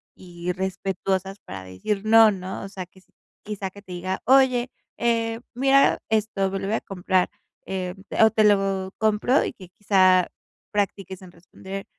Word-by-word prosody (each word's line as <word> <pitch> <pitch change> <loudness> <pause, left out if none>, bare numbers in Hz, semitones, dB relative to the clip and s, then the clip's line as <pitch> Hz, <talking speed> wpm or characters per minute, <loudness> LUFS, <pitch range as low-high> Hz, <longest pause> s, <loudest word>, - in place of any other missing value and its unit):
y 175 -1 -5
respetuosas 190 +1 -3
para 95 -1 -9
decir 95 - -4
no, 225 0 +7
¿no?, 190 -1 -6
o 195 - -7
sea 190 -2 -7
que 185 +2 -22
s 185 - -29 0.3
quizá 205 -2 -5
que 200 +2 -14
te 185 - -13
diga: 185 +1 -4
"Oye, 255 -1 +4 0.3
eh, 230 -1 0
mira 270 +2 +4
esto, 215 -3 0
me 195 0 -3
lo 195 - -4
voy 215 - 0
a - - -6
comprar", 185 -1 0 0.4
eh, 185 -1 -4 0.3
o 220 - +8
"Te 215 0 +3
lo 195 -2 +2
compro", 220 +5 +2
y - - -3
que 185 - -14
quizá 185 -3 +4 0.4
practiques 195 -2 -2
en 180 -2 -13
responder: 190 +3 -9
195 Hz, 170 wpm, -24 LUFS, 185-215 Hz, 0.4 s, o